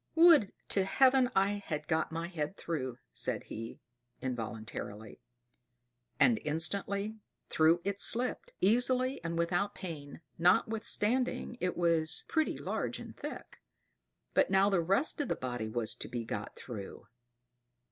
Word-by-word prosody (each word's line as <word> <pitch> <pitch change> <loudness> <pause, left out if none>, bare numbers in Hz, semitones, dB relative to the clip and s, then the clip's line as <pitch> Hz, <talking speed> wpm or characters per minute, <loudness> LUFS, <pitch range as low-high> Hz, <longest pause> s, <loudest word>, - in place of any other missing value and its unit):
"Would 325 - +7 0.2
to 195 - +2
Heaven 260 +5 +4
I 200 +1 +2
had 150 -3 -4
got 160 - 0
my 165 +1 -3
head 170 0 -4
through!" 130 -7 -3
said - - -2
he, 115 +1 -8 0.4
involuntarily; 110 -3 -6 1.0
and 235 -3 +4
instantly 200 +7 0 0.3
through 160 +2 +4
it 200 0 -2
slipped, 245 +4 0
easily 250 +6 +3
and 165 0 -3
without 175 +4 0
pain, 155 -5 -7 0.2
notwithstanding 220 +7 +2
it 180 -1 -1
was 165 -2 +1
pretty 315 -1 0
large - - -3
and - - -9
thick. - - -8 0.7
But - - +3
now 195 +1 +4
the 185 -3 +3
rest 195 - +1
of 290 - -2
the - - 0
body 120 -3 -4
was 110 0 -1
to - - -6
be 120 -1 -4
got 105 -1 -5
through! 105 -6 -8
175 Hz, 135 wpm, -32 LUFS, 145-210 Hz, 1.0 s, Would